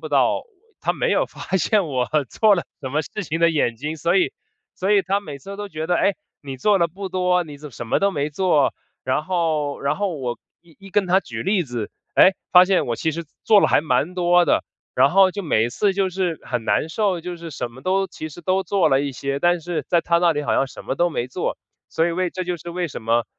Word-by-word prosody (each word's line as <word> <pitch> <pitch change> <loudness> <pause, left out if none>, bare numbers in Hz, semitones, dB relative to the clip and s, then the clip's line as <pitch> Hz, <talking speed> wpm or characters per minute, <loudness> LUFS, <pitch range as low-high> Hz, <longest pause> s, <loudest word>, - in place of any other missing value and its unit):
不 - - -6
到 - - +3
我 - - -13 0.4
她 - - 0
没 - - -1
有 - - +2
发 190 - -4
现 200 0 +2
我 130 -3 0 0.2
做 215 -2 +4
了 175 - -2 0.2
什 130 - -4
么 150 - +1
事 210 - -6
情 165 +2 -3
的 170 - +5
眼 145 -7 0
睛， 150 +6 -4
所 170 +4 +1
以 185 - +2 0.4
所 195 +3 0
以 205 - +5
她 200 +2 0
每 150 -7 -8
次 195 +9 -9
都 205 0 -6
觉 160 -1 -5
得： 175 - +2
“唉， 200 - +2 0.3
你 135 -2 -6
做 205 +5 +3
得 170 - +2
不 190 +4 -7
多， 180 -1 +1
你 145 -2 -10
怎 150 0 -9
么 - - -19
什 120 - -7
么 - - +2
都 200 0 +3
没 145 -3 -2
做。” 155 -3 +2 0.3
然 130 +4 0
后 160 -6 -1
然 140 - 0
后 200 -3 -1
我 125 -2 -3 0.2
一 170 -2 -23
一 195 -1 -13
跟 200 -1 +1
她 180 - +1
我 - - +4
举 - - -6
例 190 -1 +1
子， 120 -6 -5 0.3
诶， 190 - +7 0.2
发 180 0 +8
现 190 -1 +2
我 120 - -1
其 160 - 0
实 165 +1 -5 0.2
做 210 -2 +6
了 - - +4
还 - - +4
蛮 150 +3 0
多 175 -1 +4
的。 - - +2 0.3
然 - - +5
后 190 0 +5
就 200 +1 -5
每 110 -9 +2
一 120 - -1
次 200 +4 +1
就 195 -1 +1
是 180 -3 -2
很 120 -3 -3
难 - - +2
受， 195 -2 0
就 180 0 -5
是 165 0 -8
什 125 -4 -5
么 130 +3 -13
都 190 +4 +1
其 155 - -7
实 170 +3 -12
都 185 +3 +1
做 185 -4 +2
了 135 - +4
一 140 0 -2
些， 140 +2 -3
但 175 +3 +2
是 170 +1 -3
在 170 -1 +3
她 170 0 +2
那 170 -1 +3
里 145 - -1
好 - - -1
像 135 - +2
什 - - -11
么 - - -2
都 175 +4 +2
没 125 -6 -3
做。 - - -3 0.3
所 165 +1 +1
以 - - 0
为 180 +1 0
这 185 +1 -5
就 175 -1 -3
是 170 - -10
为 175 0 -2
什 - - -7
么， 115 +1 +1
170 Hz, 285 characters per minute, -22 LUFS, 145-185 Hz, 0.4 s, 发